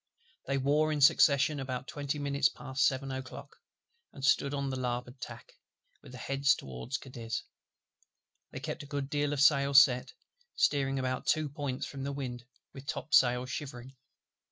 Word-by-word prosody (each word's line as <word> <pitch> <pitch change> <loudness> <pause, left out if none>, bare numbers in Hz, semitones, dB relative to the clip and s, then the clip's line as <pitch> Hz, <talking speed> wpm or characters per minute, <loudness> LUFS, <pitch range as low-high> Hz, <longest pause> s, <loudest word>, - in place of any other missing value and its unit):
They 135 +1 0
wore 150 +3 +2
in 150 - -1
succession 145 0 +5
about 130 0 -4
twenty 145 0 -3
minutes 140 +1 +1
past 130 -2 0
seven 135 0 -2
o'clock; 130 0 -8 0.5
and 135 - -5
stood 140 -2 +3
on 140 -1 -2
the - - -3
larboard 125 0 -4
tack, - - -9 0.5
with - - -14
their 125 - -8
heads 140 +1 +2
toward 65 - -6
Cadiz. 115 -4 -5 1.1
They 130 - -8
kept 150 +2 -5
a 145 - -10
good 140 -1 -4
deal 145 -1 0
of 145 - -2
sail 140 -1 +4
set; 125 -2 +6 0.4
steering 135 -2 +1
about 130 -1 -2
two 155 -1 +2
points 140 -2 -4
from 140 - -7
the 140 - -2
wind, 125 -3 -5 0.3
with 135 -1 -11
topsails 125 -5 +2
shivering. 135 -2 -7
135 Hz, 160 wpm, -31 LUFS, 130-145 Hz, 1.1 s, set